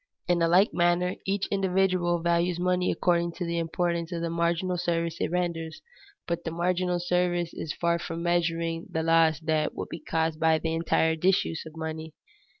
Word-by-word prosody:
In 175 -1 +2
a 165 - +4
like 185 +5 +4
manner, 175 +1 +2
each 195 0 0
individual 185 -3 +1
values 170 0 +1
money 180 0 +1
according 170 -1 +1
to 175 - -4
the 170 0 -1
importance 170 +1 -1
of 170 -1 -3
the 165 - -2
marginal 170 +2 0
service 170 -1 -1
it - - 0
renders, 170 -2 -2 0.5
but 170 0 -3
the - - -3
marginal 180 +1 0
service 175 -1 0
is 155 - -5
far 170 +1 0
from 165 0 -5
measuring 165 -1 0
the 160 - -2
loss 165 -2 +4
that 155 -1 0
would - - -5
be 165 - -6
caused 160 0 -1
by 160 -1 +4
the 160 0 -2
entire 160 0 +2
disuse 165 -2 +1
of 160 +1 -12
money. 160 0 -5
170 Hz, 180 wpm, -27 LUFS, 165-180 Hz, 0.5 s, a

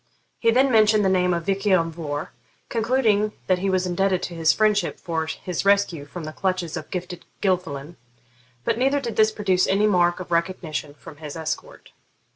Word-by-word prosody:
He 230 - +3
then 260 +3 +4
mentioned 215 -2 +4
the - - +4
name 180 -1 +2
of 170 -1 -1
Vich 195 +1 -1
lan 170 -4 +3
Vohr, 150 -2 -5 0.4
concluding 225 -3 +1
that 185 -1 +2
he 195 +2 -1
was 185 -1 +1
indebted 185 +1 0
to 175 - -4
his 165 -1 +3
friendship 215 -1 +1
for 160 -3 -3
his 175 +1 -4
rescue 200 -7 +2
from 165 +4 -8
the 155 0 -6
clutches 185 -3 -2
of 155 -3 -6
Gifted 180 -1 -5 0.2
Gilfillan, 170 -5 -2 0.7
but 230 - 0
neither 270 +3 +2
did 235 -6 -5
this 220 0 +4
produce 190 -4 +1
any 200 +2 +2
mark 175 -4 +3
of 180 -1 -8
recognition 170 -4 -2
from 150 0 -13
his 150 -1 -8
escort. 160 -1 -6
185 Hz, 185 wpm, -23 LUFS, 165-210 Hz, 0.7 s, then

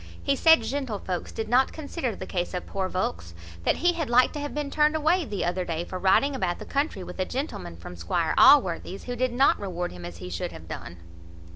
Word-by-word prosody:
He 280 - +2
said, 320 +3 +6
"Gentlevolks 220 -10 -3
did 220 - -4
not 250 +3 +3
consider 285 - -4
the 185 - -7
case 180 0 -3
of 180 - -4
poor 190 -1 -3
volks; 85 - -3 0.3
that - - +3
he 350 - +5
had 320 -6 -3
like 250 +1 +4
to 300 - -4
have 290 0 -4
been 295 -1 -3
turned 300 +1 +3
away 320 +3 +2
the 205 -8 -3
other 180 +1 -1
day, 170 -1 -3
for 185 - -6
riding 195 +10 +3
about 185 -9 -1
the - - -9
country 280 - -1
with 180 +1 -9
a - - +2
gentleman 255 - -5
from 85 +1 -9
Squire 160 - -1
Allworthy's, 195 -8 +5
who 245 - -4
did 255 +1 0
not 265 +3 +3
reward 180 -3 -4
him 90 -1 -10
as 85 0 -7
he 90 +1 -8
should 85 - -4
have - - -11
done." 85 - -7
205 Hz, 230 wpm, -26 LUFS, 175-280 Hz, 0.3 s, said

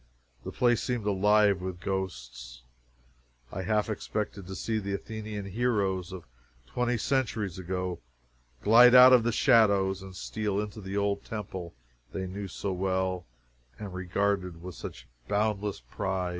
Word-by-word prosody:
The - - -6
place 120 -2 +2
seemed 120 -4 -2
alive 105 -1 +3
with 90 -1 -5
ghosts. 60 -11 -5 0.9
I 95 - -4
half 105 +2 +1
expected 105 -3 -4
to 95 - -6
see 110 +2 -1
the 100 -1 -3
Athenian 105 -1 -6
heroes 100 -4 0
of 95 -3 -8 0.4
twenty 125 - -1
centuries 110 -7 -1
ago 90 -1 -3 0.6
glide 120 +3 +8
out 125 +1 +10
of 125 - +7
the 120 +1 0
shadows 100 -4 +4
and 95 -1 -10
steal 105 0 -2
into 105 +1 -5
the 95 +1 -4
old 100 0 0
temple 95 - -6 0.4
they 95 - -3
knew 100 +2 -5
so 95 +1 -4
well 95 -1 -1 0.5
and 100 -3 -7
regarded 90 -1 -1
with 90 0 -7
such 65 -4 -9 0.2
boundless 105 - -1
pride. 90 +9 -3
100 Hz, 145 wpm, -29 LUFS, 95-105 Hz, 0.9 s, out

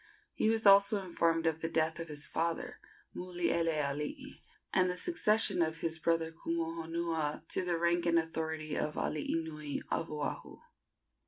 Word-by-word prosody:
He 215 - +1
was 225 -1 +1
also 200 +1 +7
informed 165 -2 +1
of 160 0 0
the 165 - -1
death 160 +1 0
of 165 - -4
his 150 -1 -1
father, 165 +1 -2 0.4
Mulielealii, 165 -5 -2 0.3
and 185 -1 +4
the 180 - -3
succession 220 - +3
of 160 0 -1
his 160 -1 -1
brother 165 0 +1
Kumuhonua 165 -1 -3
to - - 0
the 175 -2 0
rank 170 +1 +1
and 170 0 +4
authority 160 -1 -2
of 150 - -2
alii 155 +1 -1
nui 150 -2 -4
of 165 0 -1
Oahu. 150 -1 -4
165 Hz, 150 wpm, -33 LUFS, 160-170 Hz, 0.4 s, also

